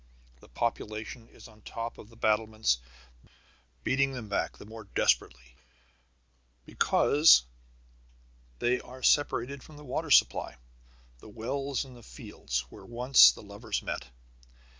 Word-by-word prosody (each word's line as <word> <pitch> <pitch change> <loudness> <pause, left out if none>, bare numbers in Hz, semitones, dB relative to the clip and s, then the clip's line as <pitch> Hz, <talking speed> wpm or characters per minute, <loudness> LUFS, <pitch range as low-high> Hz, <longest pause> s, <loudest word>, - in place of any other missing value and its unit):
The - - -19
population 110 - -4
is - - -15
on 110 -1 -19
top 115 +2 -6
of 105 - -13
the 115 - -18
battlements, 110 - +1 1.0
beating 135 0 +1
them 120 -5 -7
back 100 - -2
the - - -12
more 110 0 -11
desperately 60 -9 0 1.1
because 145 - +4 1.1
they 125 - +1
are 130 0 -13
separated 140 -2 +1
from 155 +2 -14
the 150 - -12
water 145 +4 -3
supply, 135 - +3 0.6
the 110 - -14
wells 135 +6 -3
in 130 - -13
the 120 - -14
fields 60 - -5
where - - -13
once 120 - +6
the - - -12
lovers - - -5
met. 60 - -5
115 Hz, 130 wpm, -29 LUFS, 105-135 Hz, 1.1 s, once